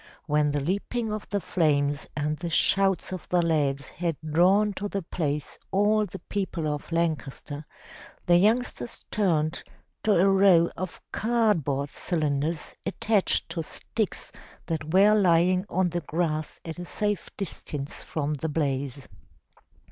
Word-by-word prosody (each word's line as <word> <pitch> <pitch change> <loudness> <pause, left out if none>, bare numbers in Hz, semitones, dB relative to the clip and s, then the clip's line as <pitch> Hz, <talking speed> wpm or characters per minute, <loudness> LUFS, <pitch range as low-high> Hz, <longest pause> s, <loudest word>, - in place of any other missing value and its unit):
When 150 -1 +2
the 145 0 0
leaping 210 - -1
of 215 -1 -6
the 205 - 0
flames 145 -6 +1
and 150 +1 0
the 170 +2 -5
shouts 195 +2 +2
of 185 -3 -6
the 175 -1 +3
lads 140 -4 +1
had 165 -3 -2
drawn 190 +7 +4
to 205 +2 -3
the 200 -2 -3
place 150 -4 -3
all 210 +2 +3
the 195 - -7
people 185 -6 -3
of 150 +2 -4
Lancaster, 155 -3 -2 0.6
the 175 0 +6
youngsters 230 +4 0
turned 160 -7 +1 0.4
to 215 - +3
a 185 +3 +5
row 190 -3 +5
of 185 -1 -5
cardboard 200 - +1
cylinders 155 -1 -2
attached 210 +1 +1
to 170 - -3
sticks 210 +6 -4 0.3
that 160 -2 -3
were 200 +4 +6
lying 185 -1 +3
on 185 0 +1
the 175 +1 -1
grass 155 -1 -2
at 165 +1 -6
a 175 - -5
safe 205 +2 -2
distance 150 -7 -5
from 150 -1 -2
the 155 +2 -3
blaze. 140 -3 -2
170 Hz, 140 wpm, -27 LUFS, 150-195 Hz, 0.6 s, the